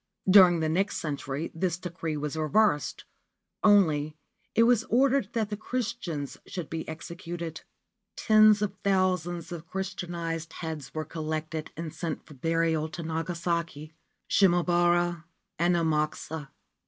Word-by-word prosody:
During 185 -3 +7
the 160 - +1
next 190 +6 0
century 145 0 -4
this 170 0 -1
decree 165 -3 -4
was 150 +1 -3
reversed; 160 +1 +1 0.6
only, 155 -8 +4 0.4
it 230 - +6
was 235 -1 +4
ordered 260 -2 +2
that 220 -2 -1
the - - -1
Christians 210 - -4
should 175 -5 -6
be 160 0 -4
executed. 170 0 -6 0.5
Tens 215 -1 +5
of 200 -2 -1
thousands 185 -3 0
of 170 -1 -7
Christianised 170 -4 -4
heads 160 -4 -6
were 155 0 -2
collected 155 0 -4
and 165 -2 -5
sent 165 -3 -4
for - - -13
burial 165 +2 0
to 170 +2 -6
Nagasaki, 165 -1 -3 0.3
Shimabara 175 -2 +3 0.3
and 175 +1 +3
Amakusa. 155 -2 -1
170 Hz, 125 wpm, -28 LUFS, 155-185 Hz, 0.6 s, During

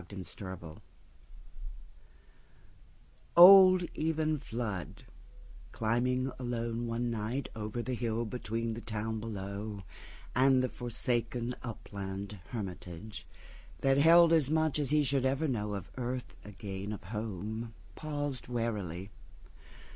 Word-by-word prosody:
Flood's 95 -4 -8
Party 90 -5 -8 2.6
OLD 185 0 +10
Eben 155 -1 0
Flood, 110 - -5 0.7
climbing 125 +4 0
along 120 -1 -2
one 120 +1 -1
nightOver 110 0 -3
the 130 - -2
hill 115 -1 -1
between 115 0 -3
the 115 - -6
town 110 0 -3
belowAnd 105 +5 -1
the 130 - 0
forsaken 120 0 -2
upland 100 -3 -6
hermitageThat 100 +5 -4
held 165 +3 +7
as 155 -5 +4
much 155 -1 +2
as 145 -3 0
he 150 0 +4
should 135 -1 +1
ever 140 +4 0
knowOn 105 - -2
earth 125 0 -4
again 100 0 -6
of 105 - -8
home, 110 +2 -4 0.2
paused 145 -4 -4
warily. 105 -6 -3
115 Hz, 100 wpm, -32 LUFS, 105-130 Hz, 2.6 s, OLD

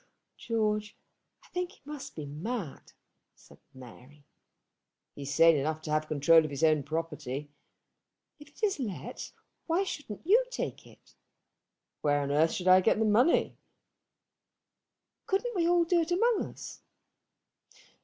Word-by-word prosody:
"George, 215 -2 -2 0.5
I - - -21
think 360 +1 -3
he - - -23
must 280 -2 -8
be 155 - -6
mad," 165 - -6 0.4
said - - -19
Mary. 130 +3 -15 0.9
"He - - -10
is 140 +1 -4
sane 165 0 +6
enough 155 +2 -1
to 155 - -5
have 155 0 +2
the 155 - -17
control 155 +2 +5
of 155 - -4
his 140 +2 -5
own 155 -2 +4
property." 150 -2 -4 0.9
"If 295 0 -14
it 295 - -20
is 400 -6 +1
let, 190 - -6 0.4
why 345 +4 +2
shouldn't 290 - -7
you 445 +8 +5
take - - -5
it?" - - -21 0.9
"Where 145 -1 +2
on 140 0 -2
earth 155 +3 +3
should 180 - -3
I 185 0 +7
get 210 - +3
the 220 - +1
money?" 235 +9 +3 1.7
"Couldn't 450 +4 -1
we 340 -2 +2
all 350 0 +4
do 340 0 +2
it 330 - -3
among 445 +5 +2
us?" - - -10
185 Hz, 150 wpm, -29 LUFS, -, 1.7 s, I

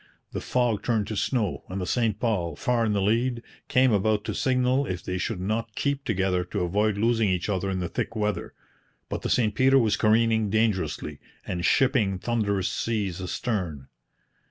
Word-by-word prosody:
The - - -4
fog 120 -5 0
turned 110 -2 0
to 110 - -3
snow, 105 -1 -1
and 95 +1 -4
the 90 - -2
St 110 0 0
Paul, 90 -9 -1
far 120 +3 +1
in 105 - +1
the 100 -1 +1
lead, 115 +3 +1 0.2
came 130 -2 +4
about 105 0 +2
to - - -3
signal 130 0 +1
if 90 -4 -4
they 90 0 -3
should 110 0 -2
not 110 +3 -2
keep 140 -1 -1
together 95 -4 +1
to 90 - -4
avoid 105 +4 +1
losing 115 -1 +2
each 90 +2 -1
other 95 -1 -1
in 95 -1 -2
the 90 - -1
thick 115 - -3
weather; 105 -1 -2 0.5
but - - -3
the - - -3
St 110 -4 +2
Peter 135 +4 +4
was 110 -4 +3
careening 110 -1 +3
dangerously, 100 -8 0 0.3
and 90 -1 -3
shipping 120 -5 +3
thunderous 100 -3 0
seas 100 -6 -2
astern. 90 - -3
110 Hz, 180 wpm, -26 LUFS, 95-115 Hz, 0.5 s, came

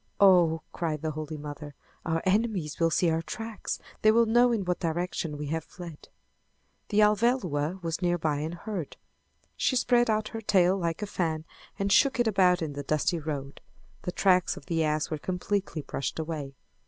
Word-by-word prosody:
"Oh!" 175 -5 +5
cried 160 -3 -3
the 155 - -1
Holy 155 0 -5
Mother, 145 0 -8 0.3
"Our 165 0 0
enemies 190 -6 0
will 165 -1 +3
see 165 +1 +2
our 160 0 0
tracks! 225 +5 -5 0.2
They 215 - +5
will 230 +1 +4
know 240 +2 +4
in 215 -5 0
what 180 0 -1
direction 165 -2 -2
we 150 - -4
have 160 -1 -2
fled!" 170 -4 -11 0.8
The 215 0 +3
Alvéloa 195 - +1
was 165 +1 -2
nearby 175 -4 +1
and 155 +3 -3
heard. 175 -3 -5 0.6
She 260 - +1
spread 245 -1 +3
out 215 0 +1
her 225 - -6
tail 190 -3 +3
like 170 +1 -2
a - - 0
fan 160 -5 -2 0.3
and 200 0 -1
shook 270 +4 +4
it 240 - +4
about 185 -4 +3
in 150 -2 -4
the 145 - -4
dusty 155 +4 0
road. 145 -3 -5 0.4
The 180 - -3
tracks 185 -1 +2
of - - -11
the 165 -2 0
ass 155 0 0
were 155 - -2
completely 185 -2 -2
brushed 140 - -4
away. 155 -4 -4
175 Hz, 180 wpm, -28 LUFS, 155-200 Hz, 0.8 s, Oh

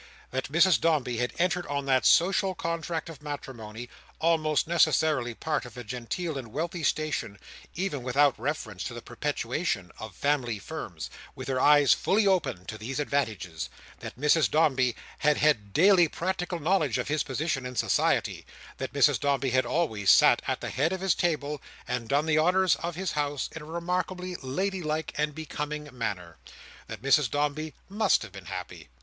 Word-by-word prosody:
That 130 +1 -3
Mrs 170 +3 +5
Dombey 145 -7 +1
had 125 +1 0
entered 180 0 0
on 140 -1 -2
that 130 -1 +3
social 190 +3 +4
contract 165 -1 -3
of 160 -4 -10
matrimony: 120 -6 -7 0.3
almost 155 -2 +2
necessarily 155 -6 +2
part 155 +3 -2
of 125 0 -11
a 125 - -6
genteel 130 - -4
and 125 - -8
wealthy 165 +5 -3
station, 150 -9 -1 0.4
even 175 -6 -2
without 135 +3 +3
reference 115 - -3
to 120 - -5
the 120 - -8
perpetuation 120 - -2
of 110 -4 -8
family 130 -3 0
Firms: 85 - -7 0.2
with 130 - -7
her 130 -1 0
eyes 145 -2 +6
fully 210 +2 +2
open 160 - +1
to 110 +2 -7
these 130 +6 -4
advantages. 110 - -2 0.3
That - - -9
Mrs 150 +2 +4
Dombey 135 -6 +2 0.2
had 150 0 +3
had 115 -10 +2
daily 180 - +5
practical 180 +2 -3
knowledge 155 -6 +1
of - - -2
his 150 +1 +1
position 145 0 -2
in 125 - -8
society. - - +1 0.4
That - - -4
Mrs - - +4
Dombey 140 -2 0
had 130 +1 +2
always 110 - 0
sat - - +7
at - - -1
the - - -4
head 150 +7 +1
of 190 - -4
his 195 -1 +3
table, 150 -4 -1 0.3
and 120 -2 -3
done 145 +2 +2
the 155 -1 +3
honours 180 +1 +4
of 170 0 -4
his 185 0 -2
house 145 -2 -2
in 165 - -6
a - - -9
remarkably 180 +2 -3
lady 185 +9 -2
like 155 0 -2
and 150 0 -1
becoming 150 -2 -5
manner. 90 -8 -4 0.5
That 110 0 -8
Mrs 140 -1 +4
Dombey 150 +3 -2
must 210 - +2
have 110 - -10
been 95 -1 -11
happy. 75 - -7
150 Hz, 175 wpm, -28 LUFS, 125-165 Hz, 0.5 s, sat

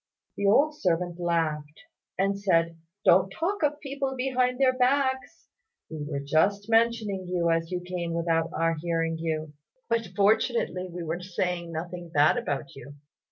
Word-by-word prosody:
The 200 - 0
old 290 +9 +4
servant 175 - -1
laughed, 155 -3 -1 0.4
and 195 +1 +1
said, 165 -4 +2 0.3
"Don't 185 +2 +5
talk 365 - -2
of 295 -1 +1
people 275 -1 -3
behind 250 -1 +1
their 260 -1 +4
backs. 260 +1 0 0.5
We 155 -1 -5
were 140 -2 -3
just 195 +8 +1
mentioning 225 -5 +2
you 175 -2 +1
as 165 0 0
you 180 -1 -3
came 175 -2 -4
without 165 -1 +1
our 165 +1 +1
hearing 165 -1 -1
you; 155 -2 -3 0.4
but 230 -1 0
fortunately 205 -2 +1
we 175 0 -5
were 165 +2 -3
saying 180 -2 -3
nothing 175 +2 -6
bad 150 -1 +4
about 140 0 -3
you. 140 +1 -11
180 Hz, 155 wpm, -27 LUFS, 165-230 Hz, 0.5 s, Don't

